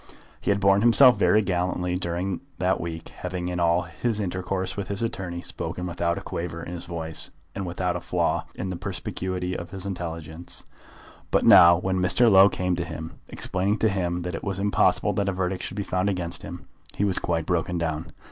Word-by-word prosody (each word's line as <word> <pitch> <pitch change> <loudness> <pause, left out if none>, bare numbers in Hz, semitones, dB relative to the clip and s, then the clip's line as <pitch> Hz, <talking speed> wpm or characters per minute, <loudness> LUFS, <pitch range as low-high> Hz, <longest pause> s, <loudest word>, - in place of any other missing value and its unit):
He - - -3
had 100 0 +3
borne 100 0 +4
himself 120 +2 +7
very 105 +1 +3
gallantly 90 -1 -1
during 90 +1 -2 0.2
that 95 +1 +1
week, 80 -1 -6
having 90 -1 -5
in 90 0 -3
all 85 +1 +3
his 105 +7 -2
intercourse 95 -1 -2
with 100 -1 -4
his 100 +2 -3
attorney, 90 -6 -3
spoken 90 - -5
without 85 -1 -1
a - - -4
quaver 85 -1 -5
in - - -7
his 90 0 -6
voice, 80 -2 -5 0.2
and 95 -2 -4
without 90 0 -1
a - - -2
flaw - - 0
in 95 0 -4
the - - -3
perspicuity 90 -1 -3
of 85 - -6
his 95 0 -7
intelligence. 85 -3 -6 0.7
But - - +2
now, 85 0 +9
when 95 +1 -1
Mr. 95 +6 +4
Low 95 +1 +8
came 90 -2 -1
to 85 - -1
him, 80 -1 -7
explaining 95 +3 -1
to 110 - +2
him 90 -2 -1
that 90 +1 -4
it 80 - -5
was 95 -2 -2
impossible 100 +1 +2
that 100 0 0
a - - -1
verdict 95 0 -2
should 95 - -6
be 100 - -1
found 95 +1 0
against 90 -3 -3
him, - - -8 0.3
he 100 - +1
was 95 -2 +5
quite 80 -2 -1
broken 90 0 0
down. 80 0 -3
90 Hz, 205 wpm, -25 LUFS, 85-95 Hz, 0.7 s, now